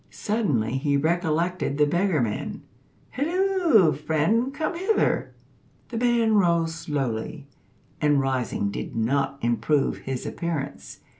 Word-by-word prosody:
Suddenly 140 - -1
he 140 0 +1
recollected 165 0 0
the 150 - +5
beggar 175 0 +1
man. 105 -3 -4 0.5
"Halloo! 330 - +3
friend; 160 - +1
come 310 +4 -2
hither." 385 +6 0 0.5
The 235 - -4
man 235 -2 +2
rose 170 -5 +2
slowly, 140 -5 -3 0.6
and 145 -2 +3
rising 125 -6 -1
did - - -6
not 140 +5 0
improve 135 +5 +1
his 130 -1 -5
appearance. 155 -5 -5
160 Hz, 115 wpm, -25 LUFS, 140-220 Hz, 0.6 s, the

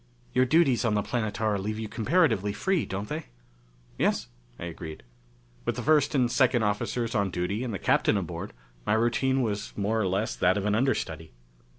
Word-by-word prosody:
Your 130 0 +4
duties 140 -4 +3
on 110 -3 +1
the 105 - +1
Planetara 110 -3 -1
leave 105 +3 -3
you 110 0 -4
comparatively 115 - +2
free, 185 - 0
don't 100 +2 -4
they?" - - -5 0.7
"Yes," - - +1 0.3
I - - -6
agreed. 80 -2 -7 0.6
With - - -1
the - - -4
first 150 -1 +3
and 125 -3 +2
second 125 -3 +3
officers 115 +3 -1
on 100 -4 +1
duty, 95 +6 -2
and 125 - -3
the 100 - -2
Captain - - +2
aboard, - - -4 0.3
my 105 - +1
routine 125 +4 +2
was 105 -3 -3
more 110 +2 +1
or 100 - +1
less 95 +4 -1
that 95 - +3
of 100 - -2
an 105 - +2
understudy. 80 - -1
110 Hz, 185 wpm, -27 LUFS, 100-125 Hz, 0.7 s, Your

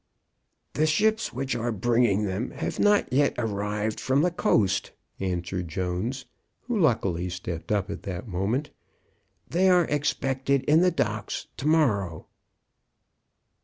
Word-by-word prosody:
"The 155 +1 +2
ships 215 +8 +2
which 130 +2 -2
are 120 0 -1
bringing 115 -1 +2
them 100 +5 -2
have - - -4
not 205 -9 +3
yet 140 +1 +3
arrived 105 -1 -2
from 135 +3 +2
the 180 - +2
coast," 105 - +1 0.3
answered 90 -1 -3
Jones, 95 - -3 0.4
who 240 -3 -2
luckily 95 - +1
stepped 90 -1 -5
up 100 -2 +1
at - - -6
the 90 -3 -5
moment. 110 +8 -2 0.8
"They 185 +3 +3
are 180 -2 +5
expected 140 -2 0
in 155 +5 +4
the 180 - +5
docks 110 - -2
to 145 - -3
morrow." 105 - +1
120 Hz, 130 wpm, -26 LUFS, 95-150 Hz, 0.8 s, are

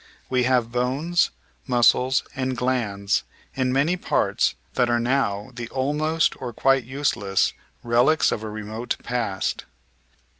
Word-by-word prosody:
We 125 -1 +2
have 125 -3 +2
bones, 135 +8 +1 0.4
muscles, 125 +1 +3
and 130 -1 -2
glands 110 -6 0 0.3
in 130 -1 0
many 140 +7 +2
parts - - +1 0.2
that 120 -1 +2
are 120 0 +2
now 120 -3 0
the 120 -1 -6
almost 150 +5 +1
or 125 -2 -5
quite 135 +1 +2
useless 120 -7 0 0.3
relics 120 +7 +3
of - - -2
a 110 - -5
remote 110 +3 -4
past. 115 -6 -2
125 Hz, 125 wpm, -24 LUFS, 115-135 Hz, 0.4 s, muscles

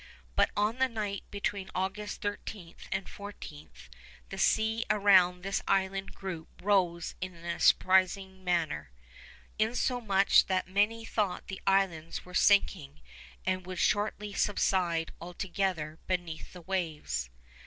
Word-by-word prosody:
But - - +4
on 215 +4 +1
the 260 0 +3
night 210 -4 -4
between 200 -1 -3
August 195 +3 -3
13 205 -3 -5 0.2
and 195 0 -2
14, 200 -7 -9 0.6
the - - -6
sea 220 +1 +2
around 190 -4 +5
this 195 +1 -1
island 195 0 0
group 175 -4 -6
rose 180 -4 +1
in 185 -1 -4
a 170 0 -5
surprising 190 0 +3
manner, 160 - 0 0.7
insomuch 220 -3 +3
that 185 -1 0
many 210 +4 +1
thought 205 -6 -2
the 190 - -6
islands 185 -5 +1
were 180 - -12
sinking 180 -7 +3 0.4
and 185 0 0
would 185 -1 -5
shortly 210 +1 0
subside 180 -5 +1
altogether 175 -3 -2
beneath 175 -3 -3
the 180 - -11
waves. 165 - -2
190 Hz, 120 wpm, -30 LUFS, 175-205 Hz, 0.7 s, around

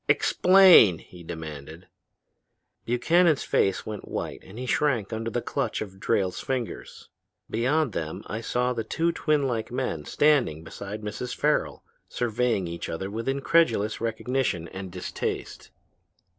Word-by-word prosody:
'Explain!' 180 - +6
he 90 +2 -14
demanded. 80 0 -8 1.0
"Buchannon's 160 +6 +3
face 95 - +1
went 105 -2 -7
white - - -5
and 95 +4 -13
he 125 - -4
shrank 125 -6 0
under 115 +1 -3
the 120 +1 -3
clutch 135 -6 -2
of 95 -3 -7
Drayle's 95 -1 0
fingers. 130 -4 -5 0.4
Beyond 130 +5 +1
them 85 +4 -4
I 110 - -5
saw 125 +2 0
the 115 -2 -3
two 165 +7 0
twinlike 140 -9 0
men 120 - -3
standing 130 - +2
beside 100 +5 -7
Mrs. 115 +4 -5
Farrel, - - 0 0.3
surveying 115 -5 0
each 85 0 -6
other 95 +4 -4
with 115 +4 -3
incredulous 135 -7 +2
recognition 115 -5 -1
and 95 -1 -7
distaste. 90 0 -5
115 Hz, 130 wpm, -26 LUFS, 95-130 Hz, 1.0 s, Explain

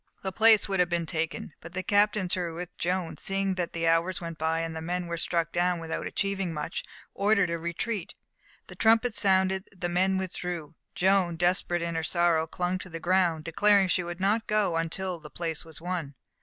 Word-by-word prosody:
The 190 - -2
place 220 +1 +5
would 195 -2 -1
have 180 -1 +3
been 170 -1 0
taken, 160 -2 -3
but 165 +1 -11
the 185 - -2
captains 205 -2 +2
who 185 - +1
were 170 -2 -4
with 175 +1 -7
Joan, 175 -3 -1
seeing 195 +3 -1
that 180 -2 -3
the 165 0 -1
hours 165 +3 +2
went 165 -2 -7
by 160 +1 0
and 165 0 -4
the 160 - -4
men 175 +2 -2
were 170 0 -3
struck 170 0 0
down 175 0 +1
without 165 -1 -4
achieving 195 -3 -1
much, 160 +1 -4 0.3
ordered 200 -3 +2
a 170 - -2
retreat. 170 +4 -3 0.5
The - - -11
trumpets 225 0 +3
sounded; 190 -1 +2
the 180 -2 -4
men 190 +2 +2
withdrew, 180 -4 -4 0.2
Joan, 185 -2 +3
desperate 175 0 +1
in 170 0 -2
her 165 - -1
sorrow, 170 -1 +2
clung 180 +3 -2
to 185 - -8
the 165 -1 -6
ground, 175 -2 +2
declaring 195 +4 +3
she 180 - +2
would 175 +1 -6
not 210 +4 +1
go 210 -5 +1
until 170 +2 -2
the 150 - -11
place 165 -2 -3
was 160 -2 -9
won. 165 -5 -4
175 Hz, 205 wpm, -28 LUFS, 165-190 Hz, 0.5 s, place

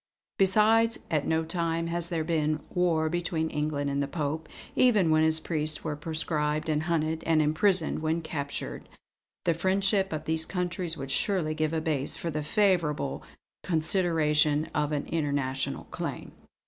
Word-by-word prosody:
Besides, 220 +4 +4
at 150 -3 +1
no 160 0 +1
time 165 0 -1
has 170 0 -1
there 165 -3 -1
been 155 -2 0
war 170 -3 +2
between 165 -1 -1
England 150 -1 -1
and 140 0 0
the 140 - -1
Pope, 150 +1 -3 0.3
even 210 -10 +4
when 155 0 +4
his 160 0 +3
priests 155 -1 -2
were 155 -2 -2
proscribed 155 0 -2
and 150 -1 +1
hunted, 160 -1 -1
and 160 -1 +4
imprisoned 160 +3 +2
when 160 +1 -1
captured. 145 -2 -5 0.6
The 170 - +3
friendship 190 +3 +1
of 155 -1 -4
these 160 0 +1
countries 180 -2 -2
would 135 -1 -5
surely 175 -2 +1
give 155 0 -1
a 160 -1 -1
base 150 -4 0
for 170 - -4
the 155 0 -2
favourable 160 - +1 0.4
consideration 155 -3 +2
of 150 0 0
an 145 -1 -1
international 140 -4 -1
claim. - - -5
160 Hz, 155 wpm, -28 LUFS, 150-175 Hz, 0.6 s, Besides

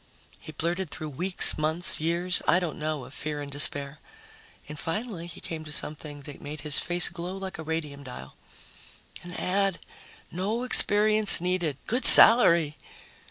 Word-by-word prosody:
He - - -13
blurted 170 +3 -4
through 155 +1 -9
weeks, 180 +4 +3
months, 160 +3 -2
years 170 +3 0
I 180 - +2
don't 175 -5 -7
know 155 -3 -5
of 130 - -15
fear 150 0 -7
and 145 -1 -9
despair. 145 0 +1 0.7
And 150 0 -10
finally 180 0 -6
he 175 - -11
came 160 -1 -8
to 155 - -10
something 150 0 -3
that 145 0 -12
made 150 +1 -9
his 150 -1 0
face 175 0 +1
glow 180 +3 -9
like 190 -3 -7
a - - -7
radium 155 -3 -6
dial. 125 -3 -12 0.9
"An 175 0 -11
ad. 195 -1 -2 0.5
No 205 +7 -4
experience 215 -4 +5
needed. 175 -5 -4
Good 245 +2 -3
salary." 170 -10 +6
165 Hz, 160 wpm, -24 LUFS, 150-185 Hz, 0.9 s, salary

